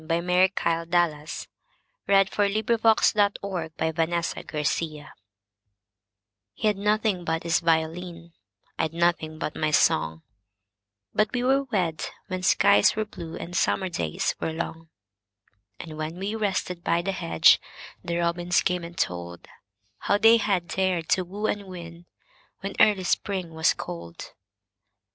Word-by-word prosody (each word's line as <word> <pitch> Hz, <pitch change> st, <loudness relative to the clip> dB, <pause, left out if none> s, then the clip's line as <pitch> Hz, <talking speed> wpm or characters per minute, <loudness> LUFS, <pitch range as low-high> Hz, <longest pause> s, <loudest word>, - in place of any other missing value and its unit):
By 165 Hz, +1 st, 0 dB
Mary 180 Hz, +2 st, +3 dB
KyleDallas 165 Hz, -3 st, -1 dB, 0.6 s
1181 205 Hz, +3 st, +2 dB
He 225 Hz, +1 st, +5 dB
'd -, -, -16 dB, 0.3 s
Nothing 200 Hz, -, -5 dB
but 160 Hz, -3 st, -4 dB
His 160 Hz, -, -1 dB
Violin 160 Hz, -2 st, -2 dB, 1.5 s
HE 215 Hz, -1 st, +1 dB
'D 195 Hz, -, -12 dB
nothing 210 Hz, -2 st, +1 dB
but 165 Hz, -1 st, -2 dB
his 170 Hz, +1 st, +2 dB
violin,I 165 Hz, -, -3 dB
'd 160 Hz, -, -18 dB
nothing 170 Hz, -2 st, 0 dB
but 155 Hz, -1 st, -4 dB
my 155 Hz, -, 0 dB
song, 80 Hz, -, +2 dB, 0.9 s
But 215 Hz, -, +2 dB
we 245 Hz, -1 st, -1 dB
were 270 Hz, +2 st, +2 dB
wed 180 Hz, -10 st, -1 dB, 0.2 s
when 185 Hz, -2 st, -4 dB
skies 200 Hz, +3 st, +4 dB
were 215 Hz, 0 st, -1 dB
blueAnd 170 Hz, -3 st, -8 dB
summer 185 Hz, +1 st, +1 dB
days 80 Hz, -, -2 dB
were -, -, -2 dB
long; 160 Hz, 0 st, -6 dB, 0.9 s
And 155 Hz, -2 st, -8 dB
when 155 Hz, +2 st, -4 dB
we 195 Hz, +3 st, -3 dB
rested 190 Hz, -5 st, -2 dB
by 170 Hz, +1 st, +1 dB
the 195 Hz, -, -1 dB
hedge, 85 Hz, -, +4 dB, 0.4 s
The 170 Hz, 0 st, -2 dB
robins 175 Hz, +1 st, +1 dB
came 180 Hz, -2 st, 0 dB
and 170 Hz, +1 st, -9 dB
toldHow 90 Hz, -, -4 dB
they 225 Hz, +1 st, +7 dB
had 195 Hz, -6 st, 0 dB
dared 185 Hz, -3 st, -1 dB
to 185 Hz, -, +3 dB
woo 200 Hz, +4 st, -5 dB
and 205 Hz, -2 st, -1 dB
win, 170 Hz, -1 st, -10 dB, 0.5 s
When 195 Hz, +1 st, -4 dB
early 205 Hz, -3 st, +5 dB
Spring 185 Hz, -2 st, -1 dB
was 160 Hz, 0 st, +2 dB
cold. 85 Hz, -1 st, -8 dB
175 Hz, 135 wpm, -25 LUFS, 160-195 Hz, 1.5 s, they